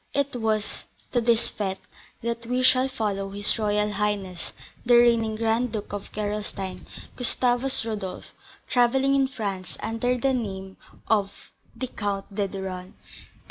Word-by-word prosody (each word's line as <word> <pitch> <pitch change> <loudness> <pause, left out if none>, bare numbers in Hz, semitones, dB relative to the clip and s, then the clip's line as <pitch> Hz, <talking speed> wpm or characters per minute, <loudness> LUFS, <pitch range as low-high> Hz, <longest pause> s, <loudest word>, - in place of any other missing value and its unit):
It 280 -1 +1
was 220 -2 -1 0.3
to 240 - +2
this 230 -1 +3
fête 195 -2 -2 0.5
that 235 0 -2
we 250 +1 +1
shall 255 0 +5
follow 205 -6 -2
his 205 +2 -1
royal 210 0 +2
highness, 205 -4 -1 0.3
the 240 0 +6
reigning 230 -2 +5
Grand 225 +2 +1
Duke 210 -2 -4
of 205 -1 -5
Gerolstein, 205 -2 -3 0.3
Gustavus 245 0 +1
Rodolph, 205 -5 -5 0.3
travelling 265 +2 +4
in 270 -1 +4
France 200 -8 -4
under 230 +3 0
the 270 +2 +2
name 190 -5 -3 0.3
of 205 -2 0 0.2
the 250 +3 -2
Count 205 -4 -3
de 200 0 0
Duren. 190 -1 -5
220 Hz, 140 wpm, -26 LUFS, 200-245 Hz, 0.5 s, the